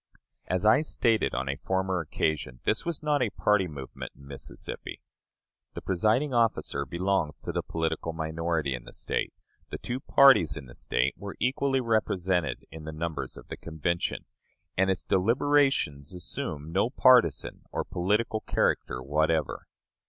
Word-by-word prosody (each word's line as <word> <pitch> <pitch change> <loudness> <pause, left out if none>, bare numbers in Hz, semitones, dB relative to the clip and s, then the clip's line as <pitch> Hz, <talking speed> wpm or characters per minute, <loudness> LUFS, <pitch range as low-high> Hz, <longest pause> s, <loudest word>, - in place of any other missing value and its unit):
As 90 +2 0
I 110 +7 +6
stated 115 - +1
on 65 +2 -2
a 70 +1 -2
former 95 +2 -1
occasion, 75 -5 -2
this 110 +10 0
was 165 -3 -2
not 150 -2 +2
a 120 - +2
party 100 0 +2
movement 70 -5 -8
in 70 - -16
Mississippi. 70 -1 -6 0.8
The - - -5
presiding 110 - +1
officer 110 - +1
belongs 85 -1 0
to - - -4
the - - -1
political 80 0 -2
minority 80 -2 -1
in - - -6
the - - -11
State; - - -2 0.4
the - - -4
two 125 +2 -4
parties 135 - +5
in 70 - -7
the - - -13
State 65 +3 0
were 100 -1 -7
equally 135 +1 +1
represented 95 - 0
in 80 -1 -9
the 80 - -5
numbers 75 -4 -4
of - - -12
the - - -6
Convention, 80 +2 -2 0.5
and 95 +1 +2
its 95 -3 0
deliberations 115 - +2
assumed 80 -2 -4
no 100 +5 +2
partisan 125 - +4
or - - -1
political 105 +5 0
character 65 - 0
whatever. 80 +3 0
90 Hz, 150 wpm, -28 LUFS, 75-110 Hz, 0.8 s, I